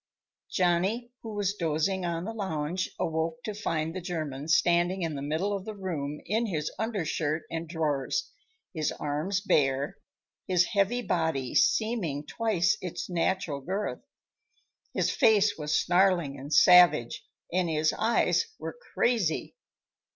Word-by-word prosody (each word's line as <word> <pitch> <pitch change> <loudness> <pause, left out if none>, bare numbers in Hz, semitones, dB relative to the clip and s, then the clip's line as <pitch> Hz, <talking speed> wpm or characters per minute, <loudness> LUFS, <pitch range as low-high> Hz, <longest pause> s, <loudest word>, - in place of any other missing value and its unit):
Johnny, 190 +7 +1
who 220 -2 -7
was 200 -1 0
dozing 175 +1 -1
on 170 +1 -3
the 225 - -4
lounge, 185 -4 -2
awoke 160 0 -2
to 215 - -4
find 165 -6 -2
the 185 - -4
German 155 -5 -4
standing 175 +3 +3
in 165 -2 -2
the 140 - -5
middle 160 +8 -1
of 195 - -5
the 215 +1 -7
room 150 -7 -4
in 225 +4 0
his 155 -6 -2
undershirt 165 -8 -1
and 165 -1 -4
drawers, 160 - -1 0.4
his 155 -3 -1
arms 155 +7 -2
bare, 140 -6 +1 0.5
his 180 -1 +3
heavy 215 +4 +1
body 160 - -1
seeming 180 -6 +1
twice 210 +1 +1
its 180 0 -5
natural 170 -4 -1
girth. 195 +8 -3 0.9
His - - +1
face 215 -2 +4
was 150 0 0
snarling 175 -5 +2
and 140 +3 -8
savage, 175 -6 +6 0.3
and 180 -2 +1
his 155 0 +1
eyes 235 - +2
were - - -6 0.2
crazy. 225 -10 +1
175 Hz, 135 wpm, -28 LUFS, 155-200 Hz, 0.9 s, savage